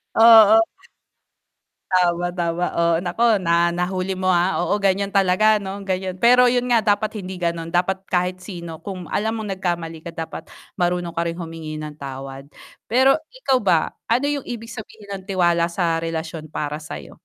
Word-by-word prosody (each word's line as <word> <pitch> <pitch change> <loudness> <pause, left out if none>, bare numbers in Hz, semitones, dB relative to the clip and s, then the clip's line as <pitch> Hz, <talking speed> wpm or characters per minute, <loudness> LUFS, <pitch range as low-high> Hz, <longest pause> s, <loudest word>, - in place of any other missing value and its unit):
Oo 225 -1 +8 1.3
Tama, 175 -1 +2
tama. 175 0 -2
Oo, 170 0 +1
naku 180 +6 -2 0.2
na 170 0 +2
nahuli 185 +1 -2
mo, 185 0 0
ah, 180 +2 +2
oo 205 - 0
ganyan 200 0 +1
talaga 200 +2 +3
'no 200 0 -6
ganyan 185 -1 -2
pero 250 +1 +6
yun 245 0 +1
nga 235 - +5 0.2
dapat 215 +1 -5
hindi 190 -1 -6
ganon 170 -2 -2
dapat 190 +2 0
kahit 180 0 0
sino 170 -4 -8
kung 185 -3 -8
alam 220 +2 -1
mong 205 -4 -4
nagkamali 170 -3 -3
ka 165 - -7
dapat 165 -1 -6 0.3
marunong 175 -1 0
ka 170 0 -2
ring 165 - -2
humingi 160 -1 -7
ng 150 0 -8
tawad, 135 0 -8 0.4
pero 260 +5 +4 0.2
ikaw 270 - +1
ba 180 -8 +2 0.2
ano 245 +5 +1
yung 285 -2 -3
ibig 230 -1 -6
sabihin 215 -2 -10
ng 190 - -16
tiwala 175 -3 +2
sa 170 -1 -1
relasyon 165 -1 -5
para 150 0 -4
sayo? 155 - -9
180 Hz, 165 wpm, -21 LUFS, 170-205 Hz, 1.3 s, Oo